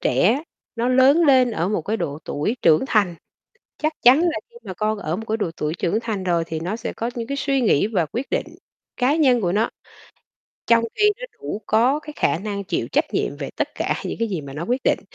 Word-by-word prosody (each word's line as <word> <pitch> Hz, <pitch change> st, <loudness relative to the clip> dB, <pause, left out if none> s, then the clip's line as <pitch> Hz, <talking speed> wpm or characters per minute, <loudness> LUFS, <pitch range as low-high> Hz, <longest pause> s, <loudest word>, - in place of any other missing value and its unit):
trẻ 215 Hz, -, +2 dB, 0.3 s
nó 235 Hz, +2 st, 0 dB
lớn 265 Hz, +6 st, +5 dB
lên 260 Hz, -4 st, +5 dB
ở 175 Hz, -5 st, -1 dB
một 205 Hz, -6 st, -1 dB
cái 215 Hz, +6 st, -1 dB
độ 145 Hz, -7 st, -3 dB
tuổi 210 Hz, -, -2 dB
trưởng 155 Hz, +8 st, +5 dB
thành, 200 Hz, -8 st, +2 dB, 0.7 s
chắc 310 Hz, -, +1 dB
chắn 255 Hz, +5 st, +7 dB
là 330 Hz, -2 st, +1 dB
khi 475 Hz, -, -26 dB
mà -, -, -6 dB
con 215 Hz, +3 st, -1 dB
ở 160 Hz, -1 st, -2 dB
một 225 Hz, -, -6 dB
cái 220 Hz, +1 st, 0 dB
độ 180 Hz, -6 st, -2 dB
tuổi 150 Hz, +1 st, -1 dB
trưởng 180 Hz, +4 st, 0 dB
thành 215 Hz, -5 st, -3 dB
rồi 170 Hz, -2 st, +1 dB
thì 160 Hz, -1 st, -3 dB
nó 180 Hz, +6 st, -3 dB
sẽ 225 Hz, -, -5 dB
có 230 Hz, -, -3 dB
những 230 Hz, -1 st, -4 dB
cái 280 Hz, 0 st, -3 dB
suy 275 Hz, -1 st, +1 dB
nghĩ 210 Hz, -, +3 dB
và 190 Hz, -7 st, 0 dB
quyết 240 Hz, -, -5 dB
định -, -, 0 dB, 0.5 s
cá 255 Hz, +5 st, +2 dB
nhân 260 Hz, -7 st, +4 dB
của 175 Hz, -3 st, +1 dB
nó. 215 Hz, +4 st, +1 dB, 1.0 s
Trong 230 Hz, 0 st, +5 dB
khi 420 Hz, 0 st, +4 dB
nó -, -, -5 dB, 0.2 s
đủ 150 Hz, +9 st, -4 dB
có 245 Hz, +7 st, +3 dB
cái 300 Hz, -1 st, -10 dB
khả -, -, +1 dB
năng 200 Hz, +1 st, -4 dB
chịu 195 Hz, -, -2 dB
trách -, -, 0 dB
nhiệm -, -, -1 dB
về -, -, -4 dB
tất -, -, -1 dB
cả -, -, -1 dB
những -, -, -4 dB
cái 230 Hz, -, +1 dB
gì 180 Hz, -7 st, -3 dB
mà 140 Hz, -1 st, -9 dB
nó 155 Hz, +4 st, -4 dB
quyết 250 Hz, +5 st, 0 dB
định -, -, +2 dB
220 Hz, 240 wpm, -22 LUFS, 175-255 Hz, 1.0 s, chắn